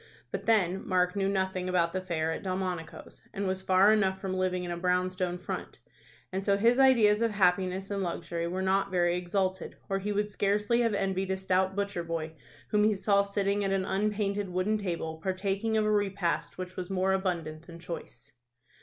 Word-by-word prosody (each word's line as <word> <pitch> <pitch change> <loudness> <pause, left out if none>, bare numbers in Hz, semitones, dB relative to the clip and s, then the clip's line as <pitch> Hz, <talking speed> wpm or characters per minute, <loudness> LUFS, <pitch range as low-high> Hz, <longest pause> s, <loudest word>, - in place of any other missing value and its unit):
But - - -5
then 195 -4 +2
Mark 180 0 +2
knew 195 -1 +1
nothing 190 -1 -1
about 170 -2 +1
the 185 - -1
fare 165 -3 -1
at - - -4
Delmonico's, 185 -3 -4
and 200 - -2
was 190 0 -1
far 190 +3 +5
enough 190 -3 +1
from 190 -1 -3
living 185 -1 0
in 175 - -4
a - - -2
brown 180 +1 +1
stone 185 -1 -2
front, 180 - -6 0.5
and 190 +1 -2
so 200 0 +2
his 235 +5 +3
ideas 230 -6 +5
of 230 - +3
happiness 190 -1 +1
and 200 -1 -1
luxury 170 -1 -3
were 185 +2 -2
not 195 +1 +2
very 175 -2 +2
exalted, 185 +1 -2
or 195 0 0
he 205 +2 -3
would 210 +1 -1
scarcely 210 +4 +1
have 230 -3 +1
envied 195 -1 -1
a 190 - 0
stout 190 0 +1
butcher 200 -3 -2
boy 165 -1 -4 0.4
whom 210 -1 +3
he 215 0 +3
saw 200 +1 +3
sitting 200 0 0
at 195 - 0
an 195 -1 +1
unpainted 200 0 -1
wooden 185 +4 0
table, 165 -4 -3
partaking 195 +4 -1
of 215 - +2
a 215 - +2
repast 195 -4 0
which 185 0 -6
was 180 0 -5
more 190 0 +1
abundant 170 -4 -2
than 170 - -10
choice. 165 -6 -8
190 Hz, 200 wpm, -29 LUFS, 180-200 Hz, 0.5 s, far